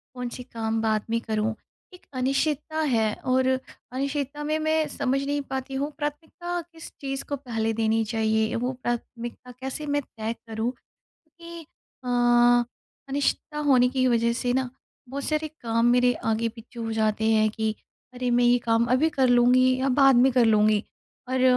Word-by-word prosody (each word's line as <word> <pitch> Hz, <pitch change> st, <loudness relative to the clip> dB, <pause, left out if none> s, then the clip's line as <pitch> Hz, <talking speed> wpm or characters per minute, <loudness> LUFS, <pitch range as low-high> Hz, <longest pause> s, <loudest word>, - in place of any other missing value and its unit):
कौन 250 Hz, -1 st, -4 dB
से 250 Hz, -, -8 dB
काम 225 Hz, -2 st, -3 dB
बाद 215 Hz, -1 st, +1 dB
में 230 Hz, 0 st, +1 dB
करूँ। 220 Hz, 0 st, -1 dB, 0.4 s
एक 360 Hz, -, -16 dB
अनिश्चितता 295 Hz, +4 st, -1 dB
है 220 Hz, -3 st, +2 dB, 0.2 s
और 260 Hz, 0 st, +3 dB, 0.4 s
अनिश्चितता 280 Hz, +2 st, -3 dB
में 310 Hz, +1 st, 0 dB
मैं 315 Hz, 0 st, +1 dB
समझ 275 Hz, 0 st, -1 dB
नहीं 285 Hz, +1 st, -1 dB
पाती 265 Hz, 0 st, -4 dB
हूँ 285 Hz, +3 st, -2 dB
प्राथमिकता 320 Hz, +4 st, -4 dB
किस 325 Hz, 0 st, -11 dB
चीज़ 270 Hz, 0 st, -3 dB
को 285 Hz, -, 0 dB
पहले 225 Hz, -4 st, -2 dB
देनी 225 Hz, 0 st, +1 dB
चाहिए? 220 Hz, 0 st, 0 dB
वो 245 Hz, +2 st, -1 dB
प्राथमिकता 240 Hz, +1 st, -5 dB
कैसे 265 Hz, +4 st, -6 dB
मैं 290 Hz, 0 st, +1 dB
तय 225 Hz, -3 st, -5 dB
करूँ 225 Hz, +2 st, -2 dB, 0.4 s
कि 335 Hz, 0 st, -13 dB, 0.4 s
अ 240 Hz, 0 st, +4 dB, 0.4 s
अनिश्चितता 285 Hz, +2 st, -1 dB
होने 250 Hz, -3 st, +5 dB
की 255 Hz, 0 st, +1 dB
वजह 235 Hz, -1 st, +2 dB
से 245 Hz, +1 st, -1 dB
ना 260 Hz, -1 st, 0 dB, 0.4 s
बहुत 275 Hz, +1 st, -5 dB
सारे 310 Hz, 0 st, -1 dB
काम 230 Hz, 0 st, +1 dB
मेरे 245 Hz, 0 st, +4 dB
आगे-पीछे 230 Hz, +1 st, -3 dB
हो 225 Hz, -1 st, -3 dB
जाते 220 Hz, 0 st, 0 dB
हैं 215 Hz, -1 st, +4 dB
कि 220 Hz, 0 st, -2 dB, 0.4 s
अरे! 250 Hz, 0 st, -2 dB
मैं 245 Hz, 0 st, +3 dB
ये 240 Hz, +1 st, +5 dB
काम 230 Hz, 0 st, +3 dB
अभी 280 Hz, +5 st, +4 dB
कर 270 Hz, -4 st, +2 dB
लूँगी 250 Hz, +1 st, +5 dB
या 270 Hz, -, +1 dB
बाद 270 Hz, -2 st, +7 dB
में 255 Hz, +2 st, +5 dB
कर 245 Hz, -1 st, +4 dB
लूँगी। 215 Hz, -1 st, +4 dB, 0.5 s
और 260 Hz, 0 st, 0 dB
250 Hz, 165 wpm, -25 LUFS, 225-275 Hz, 0.5 s, बाद